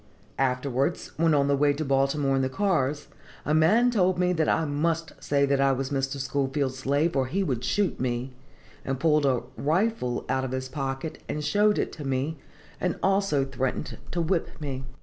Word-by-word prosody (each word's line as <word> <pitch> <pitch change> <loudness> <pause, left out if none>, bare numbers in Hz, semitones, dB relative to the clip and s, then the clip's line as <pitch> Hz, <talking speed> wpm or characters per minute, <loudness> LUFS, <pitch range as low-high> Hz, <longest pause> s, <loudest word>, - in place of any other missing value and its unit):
Afterwards, 135 +4 0
when 160 -1 +3
on 140 -1 +3
the 140 - +3
way 145 +1 +3
to 155 +2 -3
Baltimore 135 +1 +2
in 135 - +2
the 130 - 0
cars, 150 -5 0 0.4
a 150 - +1
man 215 +11 +4
told 185 -5 +2
me 180 0 +2
that 160 -3 +1
I 160 - +2
must 160 +3 -1
say 140 -1 +2
that 140 0 +1
I 135 0 +4
was 135 +1 -3
Mr. 135 0 -1
Schoolfield's 135 -1 -1
slave, 145 +5 +1
or 130 -2 +1
he 195 +9 0
would 125 -9 -2
shoot 200 +7 0
me, 125 +1 -2 0.5
and 135 -1 -3
pulled 150 -2 +3
a 130 -3 +1
'rifle' 160 - 0
out 130 0 0
of 130 -1 -3
his 130 0 -3
pocket 135 +3 -4
and 150 0 -3
showed 210 +3 +3
it - - -1
to 155 - -8
me, 135 +3 -2 0.4
and 180 -2 -1
also 195 -8 +2
threatened 135 +2 -3
to 170 - -1
whip 170 +1 0
me. 135 -3 -4
140 Hz, 190 wpm, -26 LUFS, 135-165 Hz, 0.5 s, man